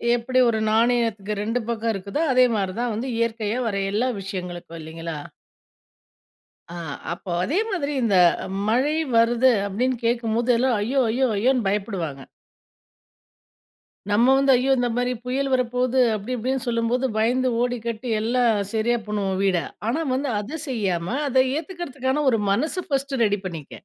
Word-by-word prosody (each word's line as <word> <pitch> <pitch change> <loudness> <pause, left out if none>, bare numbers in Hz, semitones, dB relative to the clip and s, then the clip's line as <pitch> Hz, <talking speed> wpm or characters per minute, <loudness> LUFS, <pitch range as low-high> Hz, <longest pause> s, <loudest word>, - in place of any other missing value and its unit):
எப்படி 255 +2 0
ஒரு 220 - 0
நாணயத்துக்கு 225 -2 +1
2 230 +4 -1
பக்கம் 230 -1 -1
இருக்குதோ 200 +9 -3
அதே 255 0 +6
மாரி 195 -3 -1
தான் 245 -1 -1
வந்து, 230 +5 -3
இயற்கையா 230 0 -1
வர 210 - -2 0.2
எல்லா 220 +5 +1
விஷயங்களுக்கும் 180 -3 -6
இல்லைங்களா? 165 0 -6 1.5
ஆ - - -7 0.4
அப்போ 180 +1 -8
அதே 305 - 0
மாதிரி, 295 -6 -2
இந்த 205 -5 +3 0.5
மழை 260 +7 +2 0.2
வருது 235 +3 +4 0.2
அப்படின்னு 250 +6 0
கேக்கும்போது, 235 0 0
எல்லா 260 +3 +2
"ஐயோ! 255 +6 0
ஐயோ! 260 +4 +2
ஐயோன்னு" 245 +2 +2
பயப்படுவாங்க. 195 -9 -2 1.9
நம்ம 235 +5 +4
வந்து 275 0 +4
"ஐயோ! 255 +2 +1
இந்த 245 0 +1
மாரி 245 0 0
புயல் 270 +2 -1
வரப்போவுது." 250 0 +1 0.2
அப்படி, 215 +5 -6
இப்படின்னு 260 +3 -1
சொல்லும்போது 235 +2 0
பயந்து 250 +4 +2
ஓடி 245 0 0
கட்டி 235 +1 -4
எல்லா 240 +3 +1 0.3
சரியா 235 +2 +1
பண்ணுவோம் 200 -3 -2
வீட. 190 -2 +3 0.3
ஆனா, 270 +8 0
வந்து 275 +1 -1
அதை 245 +10 -5
செய்யாமா, 195 -5 -1
அதை 260 -1 +4
ஏத்துக்கறதுக்கான 300 -6 -3
ஒரு 225 - +2
மனசு 310 - 0
ஃபர்ஸ்ட் 275 -1 -1
ரெடி 205 -2 +1
பண்ணிக்க. 165 -6 -6
235 Hz, 145 wpm, -23 LUFS, 205-255 Hz, 1.9 s, அதே